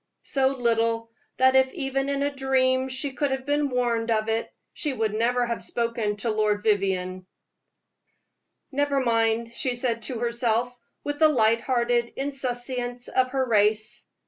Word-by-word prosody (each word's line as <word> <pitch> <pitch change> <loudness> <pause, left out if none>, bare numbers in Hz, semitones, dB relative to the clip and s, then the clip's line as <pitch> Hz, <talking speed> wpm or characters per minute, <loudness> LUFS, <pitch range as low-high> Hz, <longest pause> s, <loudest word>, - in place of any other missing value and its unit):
So 270 -1 +1
little 230 -3 0 0.3
that 260 0 +4
if 265 0 +4
even 270 -3 -1
in 280 0 0
a 285 0 -1
dream 260 -1 +1
she 265 +2 -1
could 285 +2 0
have 265 -1 -3
been 290 0 +1
warned 240 -2 0
of 220 -1 +1
it, 225 +1 -1 0.2
she 295 -3 -2
would 220 -4 -1
never 245 +3 +1
have 235 -1 -3
spoken 230 -3 -1
to 220 +2 -2
Lord 210 -1 0
Vivianne. 185 -3 0 1.4
"Never 285 0 +1
mind," 230 -1 +1
she 255 -1 -1
said 240 -2 -1
to 240 +2 -4
herself, 235 0 0 0.3
with 290 0 -3
the 315 -1 +6
light 230 -4 +3
hearted 240 -2 0
insouciance 250 -2 -3
of 255 0 +2
her 265 0 0
race. 215 -1 +1
245 Hz, 155 wpm, -25 LUFS, 225-265 Hz, 1.4 s, the